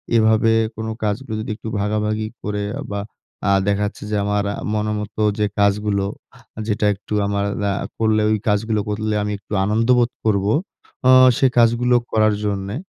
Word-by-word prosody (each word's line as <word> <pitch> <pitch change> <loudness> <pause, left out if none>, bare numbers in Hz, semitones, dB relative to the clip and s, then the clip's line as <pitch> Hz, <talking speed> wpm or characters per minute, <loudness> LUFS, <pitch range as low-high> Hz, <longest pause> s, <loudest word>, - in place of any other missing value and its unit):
এভাবে 110 0 +4 0.2
কোন 110 0 -5 0.2
কাজগুলো 110 +3 -2
যদি 110 - -5
একটু 110 - -10
ভাগাভাগি 105 +1 -1
করে 105 0 -3 0.2
আ - - -5
বা, 100 - -2 0.7
দেখা 100 0 +1
যাচ্ছে - - -9
যে - - 0
আমার 105 0 0 0.3
মনের 105 0 -1
মত 105 0 -7 0.2
যে 105 - +3
কাজগুলো 100 0 +1 0.5
আ - - -6
যেটা 105 -1 0
একটু 100 +2 -8
আমার 100 0 -1 0.3
আ - - 0 0.3
করলে 110 -1 +2
ওই 110 - +2
কাজগুলো 110 +1 +1
করলে 110 +1 -1
আমি 105 - -2
একটু 100 - -11
আনন্দ 110 +3 +1
বোধ 120 0 +2
করবো। 100 -1 +2 0.6
আ - - +7 0.3
সে - - +3
কাজগুলো 120 +1 +4 0.2
করার 110 -1 +3
জন্যে। 100 0 -2
105 Hz, 170 wpm, -20 LUFS, 105-110 Hz, 0.7 s, আ